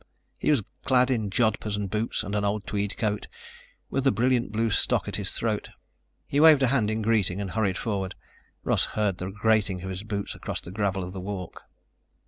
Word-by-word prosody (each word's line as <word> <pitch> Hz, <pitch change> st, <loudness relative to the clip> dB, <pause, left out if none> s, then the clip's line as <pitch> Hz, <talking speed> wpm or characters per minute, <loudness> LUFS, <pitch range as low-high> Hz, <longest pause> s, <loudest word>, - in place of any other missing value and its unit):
He -, -, 0 dB
was 140 Hz, -8 st, +3 dB, 0.2 s
clad 125 Hz, 0 st, +4 dB
in 110 Hz, -5 st, 0 dB
jodhpurs 110 Hz, 0 st, +1 dB
and 105 Hz, -1 st, -2 dB
boots 105 Hz, +4 st, -1 dB
and 100 Hz, -, -5 dB
an 105 Hz, -1 st, +1 dB
old 100 Hz, -1 st, -1 dB
tweed 100 Hz, +2 st, -2 dB
coat, 105 Hz, -3 st, -1 dB, 0.6 s
with 135 Hz, 0 st, +1 dB
a -, -, +6 dB
brilliant 120 Hz, +1 st, +1 dB
blue 110 Hz, +1 st, +1 dB
stock -, -, +2 dB
at -, -, -1 dB
his -, -, 0 dB
throat. -, -, -2 dB, 0.6 s
He 140 Hz, -, 0 dB
waved 155 Hz, -3 st, +7 dB
a -, -, +5 dB
hand 110 Hz, -6 st, +2 dB
in 110 Hz, 0 st, -1 dB
greeting 105 Hz, -4 st, +1 dB
and 100 Hz, -2 st, -3 dB
hurried 100 Hz, -4 st, 0 dB
forward. 100 Hz, -5 st, -2 dB, 0.5 s
Russ -, -, +2 dB
heard 105 Hz, -4 st, +1 dB
the 90 Hz, -, -3 dB
grating 105 Hz, -2 st, +1 dB
of 95 Hz, -, -4 dB
his 95 Hz, 0 st, -4 dB
boots 100 Hz, -1 st, -4 dB
across -, -, -5 dB
the 85 Hz, -, -10 dB
gravel 95 Hz, -1 st, -1 dB
of 90 Hz, +1 st, -6 dB
the 95 Hz, -, -5 dB
walk. 95 Hz, -2 st, -6 dB
105 Hz, 205 wpm, -27 LUFS, 95-115 Hz, 0.6 s, waved